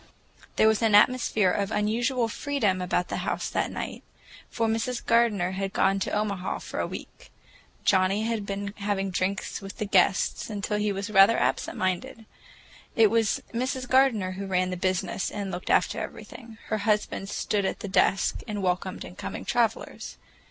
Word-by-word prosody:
There 220 - +5
was 220 0 +3
an 220 -2 +4
atmosphere 215 -3 +4
of 200 0 -1
unusual 230 +4 0
freedom 225 -6 -1
about 180 0 -1
the - - -2
house - - -2
that - - 0
night, - - -5 0.5
for 230 - -1
Mrs. 230 +2 -2
Gardener 220 -6 +3
had 195 +1 -3
gone 195 0 +2
to - - -2
Omaha 205 -3 -1
for - - -6
a - - 0
week. - - -10 0.5
Johnnie 190 +3 +3
had 225 -2 -1
been 200 0 -4
having 200 -1 -1
drinks 185 +2 -2
with 195 0 -9
the 215 - -2
guests 195 +1 +2
until 210 0 -2
he 210 0 +1
was 200 +2 -4
rather 195 +3 +6
absent - - -1
minded. 185 +5 -2 0.7
It 220 -3 +5
was 225 -2 +1
Mrs. 255 +2 -2
Gardener 250 -8 +3
who 195 +1 -5
ran 185 -1 0
the - - -2
business 185 +1 -1
and 200 -2 -4
looked 180 0 -6
after - - +2
everything. 230 -3 -9
Her 215 - 0
husband 210 -2 0
stood 205 -1 -1
at 190 - -2
the - - -4
desk 195 0 +2
and 205 -2 -3
welcomed 185 0 -2
incoming 180 - -7
travelers. 230 -2 -1
205 Hz, 170 wpm, -26 LUFS, 190-225 Hz, 0.7 s, rather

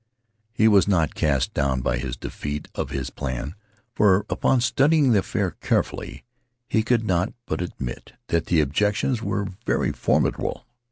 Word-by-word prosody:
He 110 -1 +3
was 100 -3 +5
not 85 -6 +2
cast 70 -5 0
down 65 -2 0
by 65 +1 0
this 65 0 -4
defeat 75 +3 -5
of - - -3
his 70 -2 -4
plan, 65 +1 -4 0.4
for, 100 -2 +4
upon 130 - +2
studying 135 +3 +3
the 105 - +5
affair - - -1
carefully, - - -2 0.4
he 110 - +2
could 115 +1 +1
not 95 -1 0
but - - -3
admit 75 -8 -6 0.2
that 85 -1 0
the 80 -2 +3
objections 105 - 0
were 100 -1 -1 0.2
very - - +1
formidable. - - 0
90 Hz, 155 wpm, -24 LUFS, 70-110 Hz, 0.4 s, was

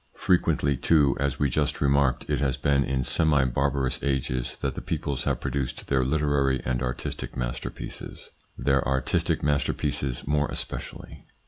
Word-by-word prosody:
Frequently 70 -2 +2
too, 70 -1 +3
as 70 -1 0
we 70 - +2
just 75 +3 0
remarked, 70 -2 +2
it - - 0
has 65 -3 +1
been 70 -1 +2
in 65 -1 -1
semi 75 0 +3
barbarous 65 0 0
ages 65 -3 -1
that 70 -2 -1
the - - -6
peoples 70 -1 -3
have 70 -4 0
pro 70 - -3
duced 65 -1 -3
their 65 -1 +3
literary 70 -1 +1
and 60 0 0
artistic 60 -1 -4
masterpieces - - -6 0.3
their 70 -1 +2
artistic 65 -1 +1
masterpieces 70 -3 -1
more 75 0 +1
especially. - - -6
70 Hz, 150 wpm, -26 LUFS, 65-70 Hz, 0.3 s, too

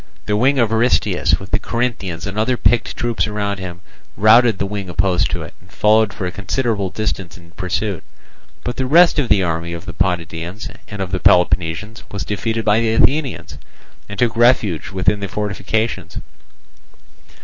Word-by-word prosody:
The 105 - 0
wing 130 +6 +3
of 115 -3 +2
Aristeus, 120 +3 +2
with 95 - -11
the - - +2
Corinthians 110 -9 -3
and 100 - -5
other 115 +4 +1
picked 120 -1 +1
troops 120 -1 -1
round 100 -2 -2
him, 90 -2 -7 0.4
routed 110 +1 +5
the 100 - -1
wing 100 -2 -5
opposed 90 0 +1
to - - -3
it, - - -10
and 95 +1 -21
followed 110 0 +3
for 95 - -5
a 90 - -2
considerable 105 0 -2
distance 95 -4 -4
in 85 -1 -17
pursuit. 95 +1 -3 0.6
But 125 - -4
the 130 - -1
rest 170 +3 +5
of 130 -5 0
the 95 - +4
army 85 0 -2
of 85 +1 -7
the 90 - -7
Potidæans 90 +3 -3
and 100 -2 -4
of 90 - -7
the 95 - -1
Peloponnesians 90 +5 +2
was 100 - -4
defeated 110 +2 -2
by 105 +1 +4
the 115 -1 +1
Athenians, 140 +2 +1 0.5
and 100 - -7
took 115 +1 +1
refuge 115 -8 +2
within 100 +2 0
the 100 - -4
fortifications. 105 +3 -3
105 Hz, 175 wpm, -19 LUFS, 95-115 Hz, 0.6 s, routed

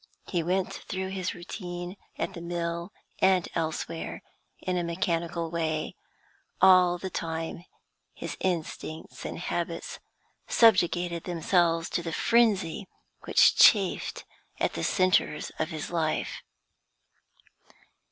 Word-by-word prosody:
He 175 -4 -1
went 180 +3 0
through 190 0 -4
his 190 -1 -3
routine, 175 0 -6 0.2
at - - -2
the 170 - -8
mill 170 +1 -3 0.3
and 185 -2 +4
elsewhere, 165 0 -3 0.4
in 185 0 -2
a 175 - 0
mechanical 170 -1 -1
way; 160 -2 -1 0.7
all 180 -1 +6
the 185 +1 -6
time 165 +1 -4 0.5
his - - -5
instincts 160 -2 -4
and - - -4
habits 170 -1 -3 0.5
subjugated 175 -6 +3
themselves 170 -1 +2
to - - 0
the 165 -1 -4
frenzy 205 -6 +2 0.4
which - - +5
chafed 195 -4 +4 0.3
at - - +1
the - - -3
centres 185 -5 +2
of 155 - 0
his 155 -2 -5
life. 160 -2 -1
175 Hz, 115 wpm, -28 LUFS, 165-185 Hz, 0.7 s, all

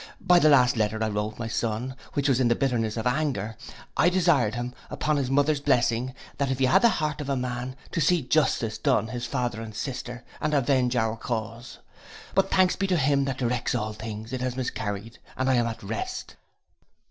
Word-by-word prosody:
By 180 -1 +5
the 155 - +5
last 125 -4 +5
letter 110 0 0
I 110 - 0
wrote 105 +1 -3
my 115 - -4
son, 115 +3 -2 0.2
which 145 0 0
was 135 -3 +3
in 130 - +3
the 120 - +3
bitterness 120 -5 0
of 110 - -3
anger, 125 -5 -1 0.4
I 175 - +4
desired 165 - +2
him, 120 +1 -4 0.2
upon 155 0 0
his 135 -3 -1
mother's 145 +2 +2
blessing, 125 -2 +1 0.2
and 140 -2 +1
if 130 - 0
he 130 - +3
had 130 - +5
the 235 - +6
heart 155 -6 -1
of 140 - -5
a 140 - +1
man, 125 0 -3 0.2
to 165 - -1
see 175 -1 +3
justice 125 -5 +1
done 110 +1 +1
his 120 +1 -4
father 120 -3 -2
and 110 -2 -8
sister, 125 0 -5 0.2
and 155 0 +1
avenge 130 -2 +2
our 110 -1 0
cause. 115 +1 -5 0.6
But 195 0 +2
thanks 185 -1 +3
be 195 - -1
to 180 -2 +2
him 140 -1 +2
that 135 -2 -2
directs 125 -1 -1
all 110 -2 -2
things, 110 +2 -7
it 130 - -2
has 130 0 -2
miscarried, 110 -3 -4 0.2
and 130 - 0
I 135 - +4
am 120 -2 +2
at 110 -1 -6
rest. 110 +3 -5
125 Hz, 210 wpm, -26 LUFS, 115-140 Hz, 0.6 s, the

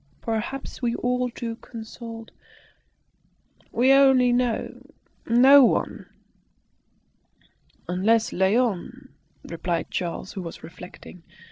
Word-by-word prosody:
Perhaps 235 +5 -4
we 240 -1 0
ought 250 0 -1
to 230 -2 -5
consult 230 -1 -10 1.4
we 255 +3 +3
only 265 -3 +5
know 245 -2 -2 0.4
no 265 +4 +7
one." - - 0 1.8
"Unless 215 +6 +1
Léon 195 +1 0 0.2
" - - -39
replied 170 0 -4
Charles, 180 +1 -4
who 190 - -5
was 170 -2 -9
reflecting. 180 +1 -12
230 Hz, 95 wpm, -24 LUFS, 190-250 Hz, 1.8 s, no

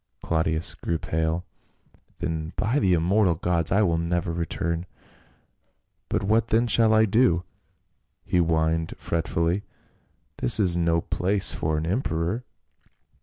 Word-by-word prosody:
Claudius 80 0 -1
grew 85 - -3
pale. 80 +2 -2 0.7
"Then 80 -1 -4
by 115 +7 0
the 95 -7 +2
immortal 90 +2 +2
gods 85 -1 -1
I 100 +3 +4
will 85 -4 +1
never 85 0 -1
return! 85 +1 -3 1.2
But - - -1
what 110 +3 +2
then 115 +2 +2
shall 115 -1 +3
I 110 0 +5
do?" 95 -5 +2 0.8
he 90 - +1
whined 80 -1 0
fretfully, 85 +2 -1 0.8
"this - - +3
is 90 -4 +3
no 85 -1 +1
place 95 +4 +1
for 80 0 -1
an 80 - -2
emperor." 90 +1 -1
85 Hz, 125 wpm, -25 LUFS, 80-100 Hz, 1.2 s, I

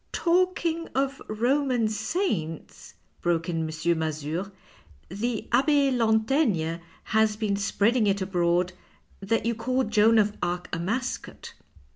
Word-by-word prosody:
" - - -42
Talking 340 -1 +1
of 275 +1 -1
Roman 245 +1 +1
saints," 215 - -3 0.3
broke 170 -1 0
in 165 -1 -1
M. 160 - -1 0.3
Mazure, 160 +4 -3 0.3
" - - -36 0.2
the 220 +5 -3
Abbe 280 +2 +3
Lantaigne 220 - +1 0.3
has 220 -1 +2
been 210 -2 -1
spreading 210 +3 +1
it 200 0 +2
abroad 180 -1 +1 0.5
that 225 +4 -1
you 235 - +1
called 250 +1 -1
Joan 220 +1 +5
of 210 -1 +2
Arc 175 +1 -2
a - - -4
mascot." 230 +9 -4
220 Hz, 130 wpm, -26 LUFS, 180-255 Hz, 0.5 s, Joan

